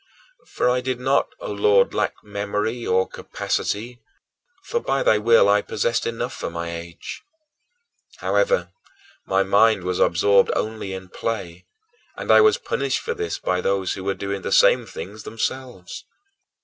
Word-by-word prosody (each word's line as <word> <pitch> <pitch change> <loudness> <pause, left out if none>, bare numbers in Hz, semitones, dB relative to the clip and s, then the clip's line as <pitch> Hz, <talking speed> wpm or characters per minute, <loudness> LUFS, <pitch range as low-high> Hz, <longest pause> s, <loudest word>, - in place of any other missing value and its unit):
For - - -1
I 125 0 +2
did 125 -1 -3
not, 135 +2 +2
O - - -5
Lord, 100 -1 +3
lack - - -2
memory 105 +3 -3
or 95 +1 +2
capacity, 120 +4 -3 0.6
for, 475 - -1
by 135 - -1
thy 110 - +4
will, 115 -1 +5
I 105 0 +4
possessed 115 +3 -1
enough 120 +2 -3
for - - -5
my 85 0 -5
age. 85 0 -8 1.0
However, - - +1 0.6
my 95 0 +2
mind 100 +1 +3
was 90 0 -2
absorbed 100 +3 +4
only 110 -3 -3
in 95 -1 -8
play, 90 -7 -5 0.5
and - - -1
I - - +8
was 430 -1 +5
punished 475 - -1
for 470 - -3
this 435 -1 -3
by 90 0 -1
those 95 -1 0
who 95 - -7
were 100 0 -1
doing 100 0 -4
the - - -4
same - - +5
things 105 +4 -8
themselves. 115 -3 -5
105 Hz, 155 wpm, -22 LUFS, 95-120 Hz, 1.0 s, I